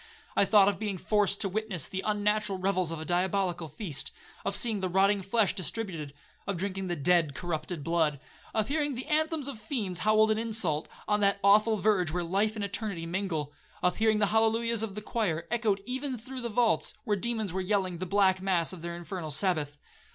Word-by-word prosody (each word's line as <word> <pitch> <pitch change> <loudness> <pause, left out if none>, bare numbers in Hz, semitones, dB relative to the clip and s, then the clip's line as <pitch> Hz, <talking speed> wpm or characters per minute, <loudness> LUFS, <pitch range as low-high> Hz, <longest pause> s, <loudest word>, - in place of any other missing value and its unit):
I - - +5
thought 195 0 +6
of 205 - +1
being 205 -3 -2
forced 200 +1 +1
to 200 - +1
witness 195 -4 -2
the 190 - -4
unnatural 210 -1 +1
revels 185 -2 0
of 165 - -4
a 160 - -6
diabolical 180 -1 0
feast,—of 190 +4 -5
seeing 225 -4 +1
the 185 -1 -1
rotting 195 +2 +3
flesh 195 +1 +2
distributed,—of 180 -2 -5
drinking 190 +1 -3
the 175 - -1
dead 165 -2 +2
corrupted 160 -1 -3
blood,—of 165 +6 -1
hearing 290 -1 0
the 255 - -4
anthems 310 -1 +1
of 265 -6 -4
fiends 210 -6 -3
howled 215 0 +4
in 215 - +1
insult, 210 -9 0 0.2
on 210 0 +2
that 200 -1 +3
awful 215 +2 +5
verge 200 -4 +2
where 175 +1 -1
life 200 +6 +1
and 210 -2 -2
eternity 200 -4 -4
mingle,—of 170 -1 -3
hearing 220 -1 +3
the 210 - +4
hallelujahs 225 0 +2
of 215 -3 -3
the 210 - -6
choir, 185 -9 -1
echoed 215 -4 +1
even 260 +1 -2
through 255 +3 -7
the 235 - -3
vaults, 230 +1 +1
where 210 -3 +1
demons 220 -2 -2
were 190 - -1
yelling 185 -2 0
the 185 - -3
black 190 0 +3
mass 185 -3 +1
of 180 - -9
their 170 0 -5
infernal 175 -1 -6
Sabbath. 150 -2 0
200 Hz, 190 wpm, -29 LUFS, 175-220 Hz, 0.2 s, thought